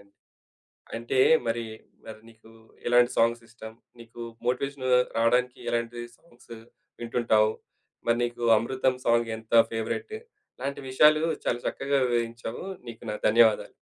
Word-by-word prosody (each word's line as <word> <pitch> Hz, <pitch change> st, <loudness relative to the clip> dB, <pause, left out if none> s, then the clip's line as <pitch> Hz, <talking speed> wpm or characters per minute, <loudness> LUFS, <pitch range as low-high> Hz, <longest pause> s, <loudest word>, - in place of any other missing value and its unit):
అండి. 100 Hz, -, -24 dB, 0.8 s
అంటే 120 Hz, +3 st, -2 dB, 0.3 s
మరీ, 115 Hz, 0 st, -2 dB, 0.4 s
మరి 110 Hz, -1 st, -10 dB
నీకూ 110 Hz, 0 st, -19 dB, 0.4 s
ఎలాంటి 120 Hz, 0 st, +4 dB
సాంగ్సిష్టం, 115 Hz, -1 st, -1 dB, 0.3 s
నీకు 115 Hz, 0 st, -12 dB, 0.2 s
మోటివేషను 130 Hz, +1 st, -2 dB, 0.3 s
రావడానికి 125 Hz, +2 st, +1 dB
ఎలాంటి 120 Hz, 0 st, -2 dB, 0.2 s
సాంగ్స్ 120 Hz, -6 st, -16 dB, 0.5 s
వింటుంటావు, 115 Hz, -2 st, +2 dB, 0.6 s
మరి 115 Hz, 0 st, +3 dB
నీకు 120 Hz, 0 st, -4 dB
అమృతం 130 Hz, +3 st, 0 dB
సాంగ్ 115 Hz, 0 st, +2 dB
ఎంత 110 Hz, +1 st, -12 dB, 0.2 s
ఫేవరెట్టు, 115 Hz, -, -4 dB, 0.4 s
ఇలాంటి 140 Hz, +2 st, -4 dB
విషయాలు 150 Hz, +4 st, +5 dB, 0.2 s
చాలా 120 Hz, -, 0 dB
చక్కగా 140 Hz, 0 st, -1 dB
వివరించావు. 115 Hz, 0 st, -3 dB, 0.2 s
నీకు 115 Hz, 0 st, -10 dB
నా -, -, -3 dB
ధన్యవాదాలు. 110 Hz, 0 st, +3 dB
120 Hz, 115 wpm, -26 LUFS, 115-125 Hz, 0.8 s, విషయాలు